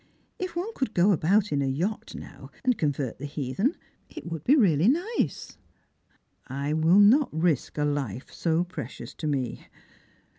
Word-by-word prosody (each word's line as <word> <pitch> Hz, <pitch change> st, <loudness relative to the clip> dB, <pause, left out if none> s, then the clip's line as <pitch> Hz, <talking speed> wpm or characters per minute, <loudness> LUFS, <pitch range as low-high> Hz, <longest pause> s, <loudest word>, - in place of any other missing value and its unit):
If 370 Hz, -2 st, -4 dB
one 380 Hz, +7 st, -3 dB
could 265 Hz, -, -3 dB
go 180 Hz, +4 st, +5 dB
about 195 Hz, +4 st, +2 dB
in 145 Hz, -1 st, +1 dB
a 135 Hz, -, 0 dB
yacht, 175 Hz, +11 st, -2 dB
now, -, -, -10 dB, 0.2 s
and 250 Hz, -1 st, +3 dB
convert 145 Hz, -, -2 dB
the 145 Hz, -, -5 dB
heathen, 150 Hz, -, -1 dB, 0.3 s
it -, -, -10 dB
would 165 Hz, -3 st, -5 dB
be 280 Hz, -, +5 dB
really 180 Hz, -, +4 dB
nice." 355 Hz, -, -1 dB, 0.4 s
" -, -, -41 dB
I 140 Hz, +3 st, -2 dB
will 160 Hz, +4 st, +4 dB
not 245 Hz, +7 st, +6 dB
risk 160 Hz, -3 st, 0 dB
a 150 Hz, -, +1 dB
life 135 Hz, -6 st, -3 dB
so 165 Hz, 0 st, +1 dB
precious 180 Hz, +1 st, -8 dB
to 155 Hz, -, -5 dB
me. 135 Hz, -5 st, -2 dB
170 Hz, 165 wpm, -27 LUFS, 145-220 Hz, 0.4 s, not